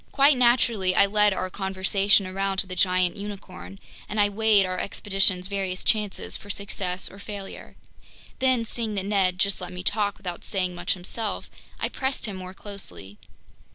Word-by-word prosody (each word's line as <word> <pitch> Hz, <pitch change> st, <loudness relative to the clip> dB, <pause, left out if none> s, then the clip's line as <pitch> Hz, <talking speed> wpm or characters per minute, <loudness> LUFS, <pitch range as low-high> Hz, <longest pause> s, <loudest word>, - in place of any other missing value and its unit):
Quite 280 Hz, +1 st, +5 dB
naturally, 235 Hz, -6 st, +3 dB
I -, -, +6 dB
led 210 Hz, +1 st, +4 dB
our 185 Hz, -1 st, -2 dB
conversation 195 Hz, +1 st, +2 dB
around 195 Hz, +1 st, -2 dB
to 195 Hz, -, +1 dB
the 185 Hz, 0 st, -6 dB
giant 185 Hz, +1 st, +2 dB
unicorn, 195 Hz, -1 st, -8 dB, 0.3 s
and 210 Hz, -, -2 dB
I 205 Hz, 0 st, +5 dB
weighed 210 Hz, -1 st, +4 dB
our 185 Hz, 0 st, -2 dB
expedition's 195 Hz, -2 st, +1 dB
various 190 Hz, -2 st, -3 dB
chances 210 Hz, -3 st, 0 dB
for 205 Hz, -, -10 dB
success 190 Hz, -2 st, -2 dB
or 195 Hz, -, -12 dB
failure. 200 Hz, -1 st, -8 dB, 0.6 s
Then, 255 Hz, -3 st, +3 dB
seeing 225 Hz, -2 st, -2 dB
that 195 Hz, -1 st, -1 dB
Ned 195 Hz, -3 st, +2 dB
just 195 Hz, 0 st, +1 dB
let 180 Hz, 0 st, -5 dB
me 180 Hz, 0 st, -6 dB
talk 205 Hz, 0 st, +1 dB
without 180 Hz, -3 st, -6 dB
saying 185 Hz, -2 st, -1 dB
much 175 Hz, 0 st, 0 dB
himself, 205 Hz, +4 st, -4 dB, 0.3 s
I -, -, 0 dB
pressed 265 Hz, 0 st, -2 dB
him 205 Hz, -3 st, -3 dB
more 185 Hz, 0 st, -8 dB
closely. 190 Hz, -, -7 dB
195 Hz, 170 wpm, -26 LUFS, 185-210 Hz, 0.6 s, I